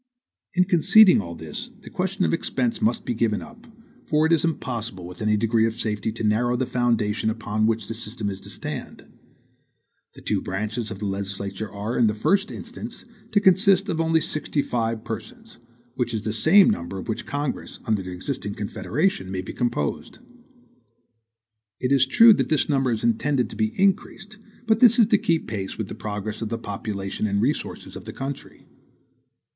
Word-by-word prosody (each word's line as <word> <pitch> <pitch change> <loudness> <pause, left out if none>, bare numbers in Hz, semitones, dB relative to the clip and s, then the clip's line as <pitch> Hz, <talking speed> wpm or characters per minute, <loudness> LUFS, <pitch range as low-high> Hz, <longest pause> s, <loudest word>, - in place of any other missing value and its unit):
In 180 - +5
conceding 190 - +6
all 85 -2 -7
this, 80 -2 -6
the - - -12
question 190 +1 -1
of - - +1
expense 230 +7 -1
must 220 - +1
be 120 - -1
given 110 -2 0
up; 230 +1 -13 0.4
for 155 0 +3
it 160 - +1
is 165 - +4
impossible, 115 - -3
with 90 0 -10
any 105 0 +2
degree 115 +1 +2
of 115 - -4
safety, 110 -1 -2
to 115 - -6
narrow 115 +3 +2
the 130 +1 0
foundation 115 -3 0
upon 110 -1 -1
which 115 0 0
the - - -3
system 110 -1 -5
is 95 -1 -4
to - - -11
stand. - - -7 1.1
The - - -13
two - - 0
branches 110 +4 -3
of 100 - -6
the 105 - -5
legislature 100 +1 -4
are, 105 +4 -4
in 115 - +5
the 105 - 0
first 195 - +2
instance, - - -8 0.3
to 205 - +4
consist 195 0 +4
of 165 - 0
only 160 0 +2
sixty 150 -2 -1
five 115 -2 -2
persons, 225 - -8 0.3
which 120 -2 -2
is 110 - -3
the 110 -1 -2
same 165 - +6
number 85 +3 -4
of 95 - -7
which 110 - -4
Congress, 145 -1 -3
under 110 -3 +1
the 90 - -7
existing 100 +3 -4
Confederation, 110 - -1
may 95 -1 -3
be - - -7
composed. 120 - -2 1.6
It 125 - -1
is 135 -2 +4
true 225 - +8
that - - -1
this 155 -2 +2
number 135 -4 +1
is 110 - -2
intended 125 +2 +1
to - - -8
be 110 - -1
increased; 200 +2 0 0.3
but 220 -1 +3
this 235 -1 +7
is 230 - +7
to 210 -1 +3
keep 165 -1 +1
pace 100 -3 -4
with 110 -3 -4
the - - -5
progress 105 0 -5
of 110 - -3
the 115 - -2
population 100 -2 -4
and 100 0 0
resources 130 +8 -2
of - - -9
the - - -7
country. 135 +1 -7
115 Hz, 190 wpm, -24 LUFS, 105-160 Hz, 1.6 s, true